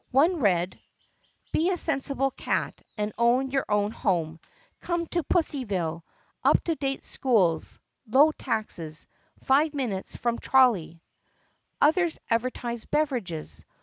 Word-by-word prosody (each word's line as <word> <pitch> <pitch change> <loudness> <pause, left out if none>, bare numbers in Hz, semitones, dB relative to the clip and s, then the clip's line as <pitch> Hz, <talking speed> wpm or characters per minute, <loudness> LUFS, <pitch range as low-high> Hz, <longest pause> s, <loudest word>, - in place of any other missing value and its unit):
One 315 +8 +3
read: 180 - +1 0.7
BE 335 +3 +2
A 370 - 0
SENSIBLE 275 -4 0
CAT - - -2 0.2
AND 210 0 -2
OWN 250 +3 +3
YOUR 270 0 0
OWN 205 0 +1
HOME 165 -7 -1 0.4
COME 345 -1 -2
TO 345 +1 -1
PUSSYVILLE! 200 - -1 0.4
UP - - +4
TO 335 - 0
DATE 275 -2 -3
SCHOOLS 190 -11 +1 0.3
LOW 275 +8 +5
TAXES 165 -8 -4 0.4
FIVE 290 +3 +3
MINUTES 225 -9 -3
FROM 235 -1 -1
TROLLEY 200 -11 +3 0.8
Others 330 +2 +3
advertised 235 0 -2
beverages. 220 - -2
245 Hz, 115 wpm, -27 LUFS, 190-285 Hz, 0.8 s, LOW